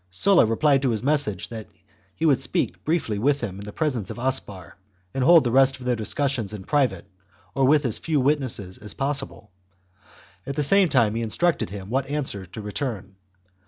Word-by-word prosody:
Sulla 175 Hz, -, +4 dB
replied 135 Hz, +5 st, +2 dB
to 135 Hz, -, +1 dB
his 115 Hz, -1 st, -2 dB
message 140 Hz, -9 st, 0 dB
that 110 Hz, -2 st, -8 dB, 0.5 s
he 165 Hz, -, -2 dB
would 145 Hz, -5 st, +4 dB
speak 130 Hz, -2 st, -2 dB
briefly 150 Hz, -10 st, -1 dB
with 140 Hz, +5 st, +1 dB
him 100 Hz, -5 st, -5 dB
in 100 Hz, -, -8 dB
the 105 Hz, -, -7 dB
presence 130 Hz, -, -2 dB
of -, -, -7 dB
Aspar, 120 Hz, -8 st, -3 dB, 0.4 s
and 135 Hz, -, -1 dB
hold 165 Hz, +2 st, +7 dB
the 120 Hz, -, -1 dB
rest 135 Hz, +1 st, +4 dB
of 125 Hz, -, -10 dB
their 125 Hz, -1 st, +1 dB
discussions 115 Hz, -1 st, -1 dB
in 105 Hz, -3 st, -7 dB
private 140 Hz, -1 st, 0 dB, 0.5 s
or 135 Hz, -1 st, +2 dB
with 145 Hz, +1 st, +3 dB
as 115 Hz, -, 0 dB
few 155 Hz, -3 st, 0 dB
witnesses 130 Hz, -9 st, -1 dB
as 105 Hz, 0 st, -6 dB
possible; 135 Hz, -7 st, -3 dB, 1.0 s
at 140 Hz, -, -4 dB
the 150 Hz, -, 0 dB
same 195 Hz, +4 st, +4 dB
time 120 Hz, -7 st, +3 dB
he 115 Hz, -, -2 dB
instructed 140 Hz, -, 0 dB
him 100 Hz, +1 st, -8 dB
what 135 Hz, +1 st, 0 dB
answer 135 Hz, -10 st, -3 dB
to 90 Hz, +5 st, -9 dB
return. 105 Hz, -3 st, -5 dB
130 Hz, 195 wpm, -24 LUFS, 105-145 Hz, 1.0 s, hold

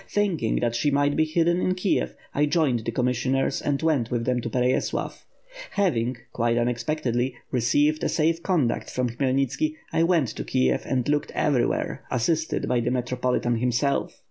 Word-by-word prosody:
Thinking 185 Hz, -, 0 dB
that 120 Hz, -1 st, 0 dB
she 120 Hz, +5 st, +1 dB
must 145 Hz, 0 st, +2 dB
be 155 Hz, -, +3 dB
hidden 170 Hz, +2 st, +1 dB
in 185 Hz, -, +1 dB
Kiev, 185 Hz, +1 st, 0 dB, 0.2 s
I 150 Hz, +1 st, +2 dB
joined 145 Hz, -6 st, +2 dB
the -, -, -1 dB
commissioners 125 Hz, +2 st, 0 dB
and 140 Hz, -1 st, 0 dB
went 145 Hz, -8 st, +1 dB
with 120 Hz, -1 st, -1 dB
them 125 Hz, -1 st, 0 dB
to 115 Hz, -, -4 dB
Perey^lav. 125 Hz, +2 st, -1 dB, 0.5 s
Hav 195 Hz, -7 st, +2 dB
ing, 120 Hz, +2 st, -1 dB, 0.2 s
quite 120 Hz, 0 st, +1 dB
unexpectedly, 120 Hz, +1 st, -1 dB, 0.2 s
received 145 Hz, +6 st, +2 dB
a -, -, +1 dB
safe 165 Hz, +1 st, +1 dB
conduct 155 Hz, -11 st, 0 dB
from 125 Hz, -2 st, -1 dB
Khmy 130 Hz, +2 st, 0 dB
elnitski, 140 Hz, -, 0 dB, 0.2 s
I -, -, +2 dB
went 165 Hz, -7 st, +3 dB
to -, -, -5 dB
Kiev 65 Hz, 0 st, 0 dB
and 125 Hz, -2 st, 0 dB
looked 145 Hz, 0 st, 0 dB
everywhere, 140 Hz, -5 st, 0 dB
assisted 160 Hz, +6 st, 0 dB
by 125 Hz, -, +2 dB
the 120 Hz, 0 st, 0 dB
metropolitan 125 Hz, -1 st, 0 dB
himself. 125 Hz, +4 st, 0 dB
130 Hz, 170 wpm, -25 LUFS, 120-155 Hz, 0.5 s, be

